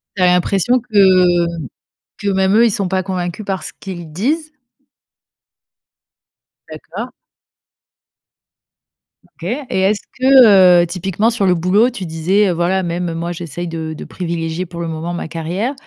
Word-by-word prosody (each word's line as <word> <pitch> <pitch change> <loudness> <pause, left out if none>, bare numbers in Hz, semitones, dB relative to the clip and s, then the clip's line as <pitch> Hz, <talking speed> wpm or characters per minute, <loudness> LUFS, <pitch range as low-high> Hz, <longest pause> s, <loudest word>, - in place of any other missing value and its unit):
Tu 195 - -3
avais 180 -1 +5
l'impression 195 +7 +2
que 185 -6 +3 0.7
que 205 - -5
même 190 0 +2
eux, 230 +2 +5
ils 230 - +2
sont 195 -1 -2
pas 185 +1 -1
convaincus 180 +1 -4
par 190 -2 -3
ce - - -7
qu'ils 175 -5 -8
disent? 300 - -2 2.2
D'accord. - - -7 2.3
OK - - -7 0.2
et 190 - 0
est-ce 205 +2 +2 0.2
que, 215 -10 +6
heu, - - 0
typiquement 190 +5 -1
sur 225 -4 -1
le 180 -1 +3
boulot, 185 +8 +2
tu 225 -7 -7
disais, 175 +6 +1
heu: - - +1
«Voilà 175 +3 0
même 170 0 -3
moi 170 +1 -4
j'essaye 175 0 -6
de 160 -1 -5
de 155 - -9
privilégier 170 0 -4
pour 170 -1 -10
le 170 - -3
moment 165 +2 -4
ma 175 - -5
carrière». 170 - -3
185 Hz, 150 wpm, -17 LUFS, 170-200 Hz, 2.3 s, que